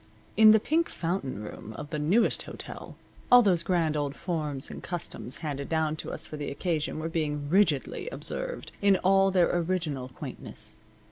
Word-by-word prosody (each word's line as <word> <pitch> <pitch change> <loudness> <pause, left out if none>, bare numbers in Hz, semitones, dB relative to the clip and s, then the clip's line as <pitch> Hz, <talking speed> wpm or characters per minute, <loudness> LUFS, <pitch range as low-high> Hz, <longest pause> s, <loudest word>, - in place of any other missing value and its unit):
In 220 0 +8
the 220 0 +7
Pink 325 +9 +1
Fountain 165 - -3
room 105 +1 -8
of 150 +1 -7
the 150 - -2
Newest 190 +10 +3
Hotel - - -8 0.4
all 245 0 +9
those 180 -5 +3
grand 165 -3 +1
old 145 -1 -1
forms 150 -6 -3
and - - -8
customs 170 -7 -5
handed 140 -2 -4
down 160 -1 +1
to - - -5
us - - -4
for 155 - -7
the 145 - -4
occasion 155 +1 -2
were 155 +1 -3
being 150 -3 -2
rigidly 185 - +2
observed - - -4
in 200 -1 +5
all 195 +1 +5
their 180 -2 +3
original 165 -7 -1
quaintness. 130 - -9
165 Hz, 175 wpm, -28 LUFS, 150-190 Hz, 0.4 s, all